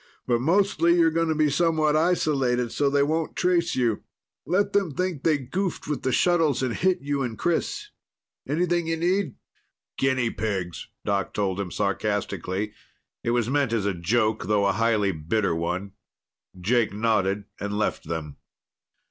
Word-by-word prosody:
"But 120 -1 +1
mostly, 170 +2 +3
you're 165 -2 +4
going 165 +1 +1
to 160 - +1
be 150 -1 +2
somewhat 155 -1 +2
isolated 135 -8 +1
so 145 -1 +1
they 140 0 +3
won't 160 +2 -1
trace 175 -2 +1
you. 120 -4 +1 0.5
Let 195 +5 +1
them 190 -8 +1
think 180 -6 -1
they 155 -3 +3
goofed 170 +8 -3
with 150 -1 -2
the 130 - 0
shuttles 165 -4 +2
and 125 -3 0
hit 185 +6 +1
you 140 0 -1
and 120 -4 -3
Chris. 175 -1 -1 0.6
Anything 170 +3 0
you 165 0 0
need?" 175 -3 0 0.6
"Guinea 130 -3 +1
pigs," 95 -6 -3 0.2
Doc 100 -2 -1
told 100 -2 -1
him 100 -2 -3
sarcastically. 100 +4 -2 0.5
It - - -1
was 120 -1 +1
meant 135 -2 +1
as 110 -3 0
a 100 - +1
joke, 105 +2 0
though 105 -1 +2
a 100 - +3
highly 105 -1 +2
bitter 85 +4 0
one. 90 +4 -2 0.7
Jake 115 +4 +2
nodded 105 -2 +1 0.2
and 100 0 -3
left 110 - -1
them. 80 -3 -5
130 Hz, 160 wpm, -25 LUFS, 105-165 Hz, 0.7 s, you're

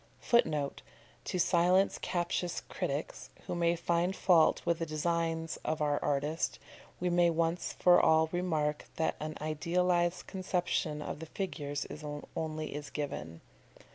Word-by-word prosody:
[Footnote: 150 - +1 0.4
To - - -2
silence 180 +2 +3
captious 175 0 -1
critics, - - -4 0.2
who - - -3
may 170 -1 +2
find 170 +2 0
fault 175 -5 +4
with 170 -1 +1
the 165 - -1
designs 165 +1 -1
of 155 - -1
our 145 -1 +1
artist, 145 +3 0 0.4
we 180 0 0
may 175 0 +4
once 165 +1 0
for 180 -1 +5
all 160 0 +5
remark 155 -4 -1
that 160 - 0
an 155 0 -5
idealised 175 +3 +1
conception 175 -5 -1
of - - -5
the 160 - -7
figures 145 -6 -3 0.5
only 155 -1 -3
is 145 0 -6
given. 85 - -5
165 Hz, 135 wpm, -32 LUFS, 155-175 Hz, 0.5 s, for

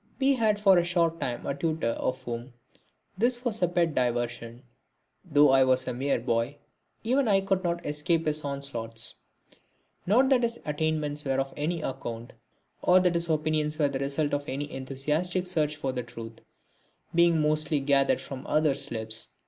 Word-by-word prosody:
We 275 0 +4
had 220 -5 +1
for 195 -3 +6
a - - +2
short 170 -1 +1
time 120 -5 -3
a - - -1
tutor 155 -2 -1
of 130 +2 -3
whom 120 +1 -6 0.7
this 245 +2 +1
was 225 -4 -1
a 180 - +4
pet 170 -2 +1
diversion. 120 -1 -2 0.6
Though 150 -5 +4
I 135 0 +6
was 130 0 +2
a 125 - -1
mere 135 +1 0
boy, 120 +3 -1 0.5
even 255 +3 +2
I 195 -2 +4
could 195 -1 0
not 170 -1 -2
escape 150 +3 0
his 155 0 -1
onslaughts. 120 -6 -2 0.9
Not 250 +7 +4
that 260 -3 +4
his 235 0 -1
attainments 150 -1 -1
were 135 -1 0
of 135 0 -2
any 160 +2 -2
account, 120 -2 -5 0.5
or 180 +1 +5
that 180 -1 +2
his 170 0 -2
opinions 155 -1 0
were 145 -2 +2
the 135 -1 -3
result 140 +2 -1
of 145 0 -2
any 145 +2 -4
enthusiastic 150 +7 -1
search 155 -4 0
for 135 -3 -3
the 125 -1 -3
truth, 115 -1 -10 0.7
being 170 -1 +4
mostly 155 0 +2
gathered 140 0 +2
from 135 -1 -8
others' 150 -3 +1
lips. 110 -1 -3
150 Hz, 175 wpm, -27 LUFS, 130-170 Hz, 0.9 s, for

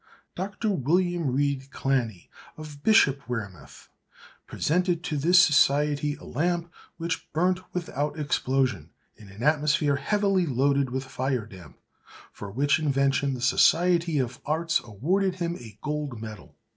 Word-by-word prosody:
Dr. 200 +4 -3
William 175 +1 +1
Reid 140 0 -1
Clanny, 125 -9 -2 0.3
of 150 -2 -10
Bishopwearmouth, 125 - 0 0.6
presented 175 +1 0
to 160 - -3
this 165 +6 +3
society 150 -3 +4
a - - -16
lamp 170 +4 -2 0.2
which 165 -1 -4
burnt 180 +3 +1
without 150 -4 -3
explosion 130 - 0 0.3
in 105 -3 -15
an 100 +4 -9
atmosphere 150 -1 +2
heavily 195 +3 +1
loaded 140 0 +1
with 130 +1 -3
fire 130 -3 -2
damp; 95 -7 -14 0.5
for 100 - -9
which 140 +9 +1
invention 140 -2 +1
the 125 - -7
Society 170 +5 +3
of 130 -1 -2
Arts 165 +2 0
awarded 180 - -1
him 170 -1 -3
a 110 -4 -12
gold 150 -5 -3
medal. 110 -3 -10
145 Hz, 130 wpm, -26 LUFS, 130-170 Hz, 0.6 s, society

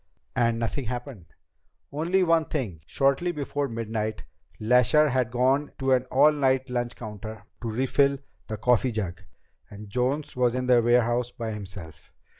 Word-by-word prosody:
"And 115 -2 +2
nothing 115 +4 -2
happened?" 120 - -6 0.6
"Only 170 +6 +1
one 165 -2 +3
thing. 110 - -4
Shortly 140 +6 +1
before 145 -2 -3
midnight, 110 -2 -3 0.4
Lasher 125 +7 +4
had 125 -3 +1
gone 130 +4 +1
to 135 -1 0
an 130 -1 +3
all 135 +4 +5
night 130 -3 +1
lunch 120 -1 -2
counter 110 -1 -8 0.2
to 115 - -3
refill 135 +4 +2 0.3
the 110 - -4
coffee 125 +3 +2
jug, 100 -6 -4 0.5
and 105 0 -11
Jones 130 +5 -1
was 125 -1 +2
in 125 0 -1
the 125 -1 +5
warehouse 120 +1 +2
by 115 -2 -5
himself. 95 -6 -9
125 Hz, 150 wpm, -26 LUFS, 110-135 Hz, 0.6 s, all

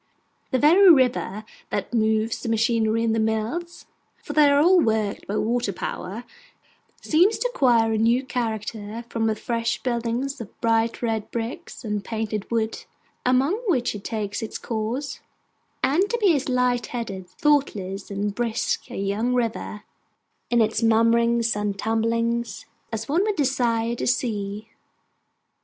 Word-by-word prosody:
The 260 - +1
very 345 +8 +6
river 250 - +3 0.3
that - - -3
moves 220 0 +1
the 235 - -4
machinery 225 0 +2
in 225 -1 +1
the 225 - +1
mills 220 +11 -2 0.4
(for 295 - -6
they 295 -1 +6
are 285 0 +4
all 355 +4 +6
worked 220 -7 0
by 205 - -2
water 235 -1 0
power), 195 +4 -5 0.8
seems 360 +8 +3
to - - 0
acquire 235 - +3
a 220 - 0
new 235 +4 +3
character 225 -2 -4
from 225 -1 0
the 220 - +1
fresh 230 +1 -2
buildings 240 +2 -2
of 215 - -11
bright 230 +1 +1
red 220 -2 -1
brick 230 +1 -5
and 210 -3 -2
painted 215 -1 -3
wood 225 -1 -1 0.4
among 260 +6 +3
which 260 -10 +1
it 205 -2 -8
takes 210 -2 -3
its 225 - -5
course; 235 +5 -3 0.6
and 355 +9 +2
to 475 - 0
be 400 -8 +4
as 275 -1 -2
light 250 -2 +1
headed, 195 -7 -5
thoughtless, 200 - 0
and 200 0 -2
brisk 235 +2 -2
a 245 - -7
young 205 +5 0
river, 225 -3 -2 0.7
in 240 -1 +3
its 220 +1 +1
murmurings 230 +1 +3
and 205 -1 -2
tumblings, 230 0 -1 0.3
as 225 0 -4
one 320 +6 +2
would 420 0 0
desire 240 -6 +1
to 235 - -3
see. 215 -4 -1
230 Hz, 150 wpm, -24 LUFS, 220-250 Hz, 0.8 s, very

